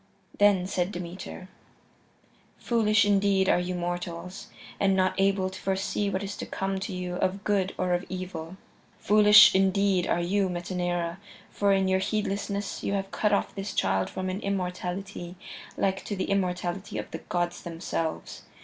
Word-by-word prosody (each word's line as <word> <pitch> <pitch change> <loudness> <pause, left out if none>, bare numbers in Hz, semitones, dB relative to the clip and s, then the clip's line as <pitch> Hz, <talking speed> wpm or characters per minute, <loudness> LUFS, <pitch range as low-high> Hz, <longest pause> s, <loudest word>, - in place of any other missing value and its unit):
Then 205 -3 +5
said 185 0 -1
Demeter: 180 0 -7 1.1
"Foolish 215 -3 +3
indeed 200 -1 +3
are - - +4
you 180 +1 -2
mortals, 175 +1 -5 0.3
and 195 -1 +3
not 185 0 +2
able 195 -1 +2
to 190 - -8
foresee 195 +1 -1
what 190 0 -2
is 200 0 -5
to - - -5
come 195 0 -2
to 195 +2 -4
you 180 -1 -4
of 195 +2 -1
good 195 -2 0
or 180 -1 0
of 175 +2 -1
evil." 185 -2 -6 0.4
"Foolish 210 +1 +7
indeed 195 -1 +2
are - - +1
you, 190 +2 +1
Metaneira, 175 0 -2 0.3
for 200 -1 +1
in 195 -1 +3
your 190 0 +2
heedlessness 200 0 -2
you 200 - -2
have 195 -1 -2
cut 210 - +1
off 200 - +1
this 195 0 -5
child 95 0 +1
from 185 0 -4
an 185 +1 -3
immortality 185 -1 -4 0.4
like 195 -1 0
to 205 - -3
the 190 - -2
immortality 185 0 -1
of - - -5
the - - -5
gods 175 0 -2
themselves. 165 -1 -4
190 Hz, 160 wpm, -27 LUFS, 180-200 Hz, 1.1 s, Foolish